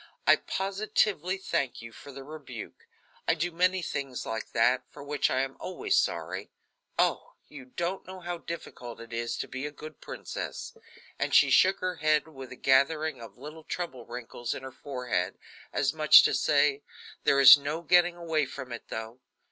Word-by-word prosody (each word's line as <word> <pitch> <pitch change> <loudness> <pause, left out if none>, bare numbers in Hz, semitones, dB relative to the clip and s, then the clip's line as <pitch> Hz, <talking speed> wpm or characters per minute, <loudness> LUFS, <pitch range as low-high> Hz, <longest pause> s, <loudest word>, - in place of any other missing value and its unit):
I - - +7
positively 195 -2 -1
thank 140 -8 -2
you 115 0 -9
for 140 +6 -12
the 135 0 -9
rebuke. 155 - -10 0.4
I - - +4
do 170 +2 -1
many 180 +2 +1
things 135 -5 -4
like 110 0 -4
that, 125 +2 +3
for - - -11
which 145 0 0
I 130 - +1
am 135 0 -3
always - - -1
sorry. - - -1 0.5
Oh! - - +1 0.2
you 140 -3 -10
don't 175 +9 -4
know 185 0 -8
how 175 -1 -5
difficult 125 -8 -8
it 115 0 -10
is 115 0 -2
to - - -4
be 130 +3 -4
a - - -7
good 155 +1 -11
princess." - - -6 0.4
And - - 0
she - - +6
shook 190 +1 +5
her 185 -1 -2
head, 155 0 +2
with 135 -5 -10
a - - -7
gathering 140 +2 +2
of 115 - -11
little 155 +4 -10
trouble 135 -11 -5
wrinkles 120 0 -5
in - - -8
her 130 - -7
forehead, 125 -9 -3 0.3
as 145 - +1
much 155 -1 +7
as - - -2
to - - +2
say, 145 -1 +2 0.4
"There 140 - +4
is 135 0 +12
no 145 +3 -4
getting 175 +1 +4
away 160 -4 0
from 130 -2 -8
it, 120 - -7
though." 110 +2 -6
145 Hz, 185 wpm, -28 LUFS, 130-170 Hz, 0.5 s, is